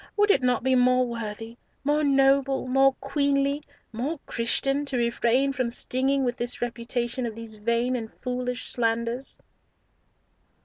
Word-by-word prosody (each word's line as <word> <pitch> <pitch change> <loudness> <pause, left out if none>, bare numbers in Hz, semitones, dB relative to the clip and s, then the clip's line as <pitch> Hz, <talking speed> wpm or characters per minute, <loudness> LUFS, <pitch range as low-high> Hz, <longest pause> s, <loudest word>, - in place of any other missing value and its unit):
would 415 0 +5
it - - +3
not 250 -2 +1
be 260 0 +2
more 255 0 +4
worthy, 225 -1 -6 0.3
more 295 +2 +1
noble, 275 -1 +3
more 270 +1 +4
queenly, 280 0 0 0.3
more 275 +8 -3
Christian, 275 +4 +1
to 275 -3 -2
refrain 240 +3 +1
from 255 -2 -1
stinging 265 +3 0
with 245 -1 -1
this 240 +1 -2
repetition 240 +1 -2
of 220 - -6
these 230 -1 -7
vain 235 +4 0
and 225 -3 -5
foolish 250 0 -4
slanders?" 235 +2 -1
250 Hz, 140 wpm, -26 LUFS, 235-275 Hz, 0.3 s, would